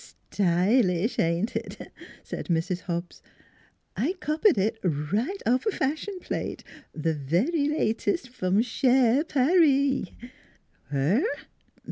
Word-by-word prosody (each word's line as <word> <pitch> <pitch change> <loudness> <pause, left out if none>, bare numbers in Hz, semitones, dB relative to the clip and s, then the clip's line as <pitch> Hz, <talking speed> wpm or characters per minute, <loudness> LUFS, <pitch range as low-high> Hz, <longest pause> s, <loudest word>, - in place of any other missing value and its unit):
"Stylish! 185 +2 +2
ain't 170 +7 0
it?" - - -6 0.3
said - - -6
Mrs. 170 +1 0
Hobbs. 170 -1 -5 0.7
"I 285 - 0
copied 360 +1 +1
it 220 +4 0
right 195 - -1
off 250 - +1
a - - +3
fashion 315 +7 -2
plate - - -5 0.3
the 160 +1 -1
very 190 - 0
latest 280 - -1
from 200 -3 +1
Sher 255 +2 +3
Par 320 +3 +3
ee." 275 - +2
230 Hz, 105 wpm, -26 LUFS, 180-290 Hz, 0.7 s, a